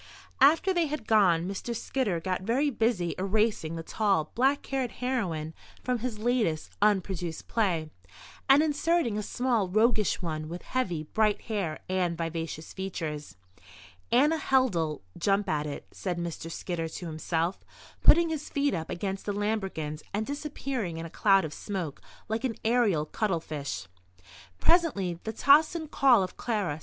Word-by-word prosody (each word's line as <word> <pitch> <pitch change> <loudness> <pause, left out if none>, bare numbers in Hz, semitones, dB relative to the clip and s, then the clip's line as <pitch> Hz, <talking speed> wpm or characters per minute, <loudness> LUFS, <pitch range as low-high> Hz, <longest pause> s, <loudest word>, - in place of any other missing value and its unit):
After 320 +7 +5
they 345 -3 +2
had 300 -5 -4
gone 180 -6 +4
Mr. 200 +5 -4
Skidder 220 -7 -1
got 185 +2 -2
very 255 +9 +1
busy 220 -8 0
erasing 195 -4 0
the 165 - -5
tall, 195 -5 0
black 270 +4 +2
haired 265 -3 -2
heroine 185 -12 -2 0.3
from 250 -1 0
his 235 -1 -3
latest 215 -9 0
(unproduced) 190 -5 0
play 170 -9 0 0.6
and 280 +3 +7
inserting 310 -4 +1
a 210 - -1
small, 235 -1 0
roguish 215 +1 +2
one 155 -3 -4
with 175 +2 -6
heavy, 180 -12 -1
bright 210 +6 +1
hair 195 -9 -3
and 180 -2 0
vivacious 165 -1 -4
features. 155 - -5 0.7
"Anna 295 +7 +4
Held'll 175 - +1 0.2
jump 200 +2 +2
at 150 -4 0
it," 145 - -6
said 180 -3 -3
Mr. 170 -1 -4
Skidder 165 -1 -3
to 170 +2 -7
himself, 165 +2 -2 0.4
putting 335 +1 +6
his 310 -2 -4
feet 285 0 +1
up 160 -2 -3
against 195 +2 -4
the 205 - 0
lambrequins 195 -8 -2
and 215 +1 -1
disappearing 275 - -4
in 165 - -5
a 165 - -9
cloud 195 -3 +4
of 155 - -6
smoke 180 -8 -5 0.3
like 220 +1 -2
an 245 -4 -1
aerial 220 -10 +3
cuttlefish. 155 - -3 0.7
Presently 205 - +2
the 220 - -2
tocsin 310 +6 +4
call 255 -9 +5
of 185 - -6
"Clara!" 200 -10 -1
200 Hz, 150 wpm, -28 LUFS, 165-245 Hz, 0.7 s, and